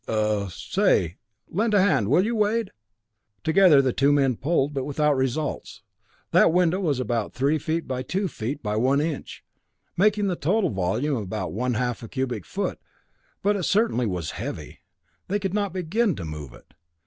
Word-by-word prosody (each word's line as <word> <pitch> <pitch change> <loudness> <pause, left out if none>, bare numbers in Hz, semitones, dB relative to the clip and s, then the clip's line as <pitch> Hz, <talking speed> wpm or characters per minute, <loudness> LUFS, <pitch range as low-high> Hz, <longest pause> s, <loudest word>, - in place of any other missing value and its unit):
"Uh 105 -2 0
say, 90 - 0 0.3
lend 215 +4 0
a - - +6
hand 145 - +3
will 165 - +3
you, 235 +1 -1
Wade." 215 0 +1 0.7
Together 160 -4 +5
the 130 -2 +1
two 140 +1 +3
men 135 -3 +3
pulled, 145 +2 0
but 135 -2 -2
without 145 +1 +1
results. 130 +3 -3 0.5
That - - +5
window 180 +1 +2
was 150 -9 0
about 120 -4 -2
three 140 +4 +1
feet 160 +3 -2
by 130 -1 -2
two 190 +9 -2
feet 135 -1 -5
by 105 0 -1
one 130 +5 +3
inch, 155 -1 -4 0.5
making 210 +2 +3
the 185 -3 0
total 185 +7 +1
volume 110 +9 0
about 95 -3 -4
one 125 +3 -1
half 125 0 -1
a 115 - -8
cubic 125 - -3
foot, - - -3 0.6
but 205 +1 +3
it 200 - -2
certainly 195 - +1
was 90 -5 -3
heavy. - - -7 0.5
They 200 - 0
could 195 -2 -3
not 205 -2 0
begin 190 +3 0
to 85 - -6
move 75 -4 -7
it. - - -20
145 Hz, 175 wpm, -25 LUFS, 120-190 Hz, 0.7 s, a